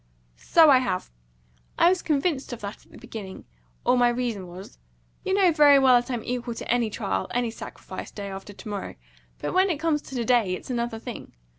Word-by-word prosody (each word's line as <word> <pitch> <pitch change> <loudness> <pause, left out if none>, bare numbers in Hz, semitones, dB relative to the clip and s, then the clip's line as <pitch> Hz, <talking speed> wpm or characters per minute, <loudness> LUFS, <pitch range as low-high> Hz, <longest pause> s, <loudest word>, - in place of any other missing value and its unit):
"So 315 - +5
I 260 - +7
have. 185 - -2 0.7
I - - +5
was 370 -1 +1
convinced 290 -2 0
of 235 - -8
that 200 0 -7
at - - -25
the - - -13
beginning, 195 -4 -9 0.4
or - - +4
my 245 0 +5
reason 235 -6 -2
was. 180 - -11 0.4
You 380 - 0
know 380 -3 +5
very 295 -3 +7
well 265 -2 +6
that 245 - -14
I 250 - -1
am 225 - -5
equal 245 -1 -3
to - - -7
any 240 -2 +2
trial, 95 - -2
any 240 -2 0
sacrifice, - - -8
day 205 - -7
after 195 +1 -8
to 205 - -12
morrow; 200 - -5 0.4
but - - -4
when 375 +1 +4
it 335 - 0
comes 315 -2 +1
to 250 -5 -4
day 230 -7 +3
it's 220 - -8
another 235 -1 -2
thing. 230 +1 -8
245 Hz, 210 wpm, -25 LUFS, 210-280 Hz, 0.7 s, I